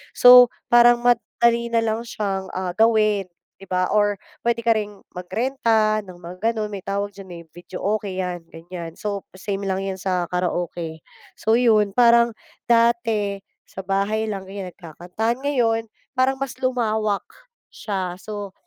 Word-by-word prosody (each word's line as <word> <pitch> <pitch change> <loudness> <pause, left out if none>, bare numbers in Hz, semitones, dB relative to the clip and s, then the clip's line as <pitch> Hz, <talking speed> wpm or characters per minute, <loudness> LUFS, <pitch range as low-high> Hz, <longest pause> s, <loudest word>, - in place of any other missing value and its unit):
So 250 0 +9 0.2
parang 240 0 +6
madali 235 -1 +2
na 230 -1 +1
lang 225 +1 -2
siya, 195 -3 -3
ah, 185 -1 -2
gawin 215 -3 +3 0.3
di 195 - -13
ba? 185 -1 0
Or 205 -1 +2 0.3
pwede 235 0 +1
ka 235 - -1
ring 205 -1 -5 0.2
mag 180 - -6
renta 225 -2 +1
ng 185 - -10
mga 185 +6 -2
ganun 215 -2 -2
may 200 -3 -7
tawag 200 +1 -2
diyan, 185 -4 -10
eh, - - -14
videoke 185 +5 -4
yan 180 -3 -4
ganyan 170 0 -8
so 200 +1 -5
same 195 +1 -4
lang 190 -1 -1
yan 195 -1 -3
sa 180 -2 -1
karaoke. 175 -2 -3 0.4
So 220 +1 +2
yun 220 -4 +4
parang 235 -1 +5 0.3
dati, 230 -4 +2 0.3
sa - - -11
bahay 200 +3 -1
lang 195 -2 -5
ganyan 190 -1 -7
nagkakantahan 180 - -4
ngayon, 230 -5 0 0.3
parang 260 +1 +2
mas 270 -1 -3
lumawak, 220 -5 0 0.5
siya, 190 -4 -3
so 205 -2 -7
210 Hz, 150 wpm, -22 LUFS, 190-230 Hz, 0.5 s, So